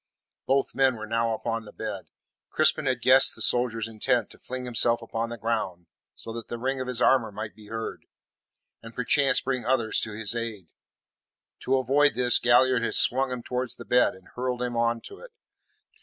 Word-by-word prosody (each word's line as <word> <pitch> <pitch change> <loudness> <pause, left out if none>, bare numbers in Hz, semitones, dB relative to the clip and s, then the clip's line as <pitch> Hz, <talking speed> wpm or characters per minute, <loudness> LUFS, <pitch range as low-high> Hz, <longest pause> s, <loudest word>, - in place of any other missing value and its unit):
Both 135 +1 +1
men 135 -2 +2
were 110 -1 -7
now 115 +1 0
upon 115 0 -4
the - - -12
bed. - - -6 0.4
Crispin 155 -1 +2
had 125 -3 -1
guessed 130 +1 +6
the - - -6
soldier's 115 -2 +1
intent 115 +1 -1
to - - -16
fling 130 0 -6
himself 120 -1 +2
upon 115 0 -4
the 120 - -6
ground 105 -6 -3 0.3
so 115 - -9
that 115 0 -7
the 120 - -5
ring 130 +2 -2
of 130 - -5
his 125 -1 -1
armour 120 -5 +3
might 105 +1 -7
be 105 -1 -16
heard, 115 +1 -6 0.7
and 115 0 -12
perchance 135 +3 +2
bring 130 -2 -2
others 115 -2 +1
to 110 - -3
his 110 +1 -2
aid. 110 -7 -5 0.9
To 135 +1 +1
avoid 140 +3 +2
this, 125 -1 +5
Galliard 125 +1 +4
had 115 - 0
swung 130 +1 +3
him 125 -2 -5
towards 125 0 -4
the - - -11
bed, 125 -5 +3
and 95 - -18
hurled 125 0 -3
him 120 -1 -3
on 115 0 0
to 400 - -11
it. - - -14
120 Hz, 195 wpm, -26 LUFS, 115-130 Hz, 0.9 s, guessed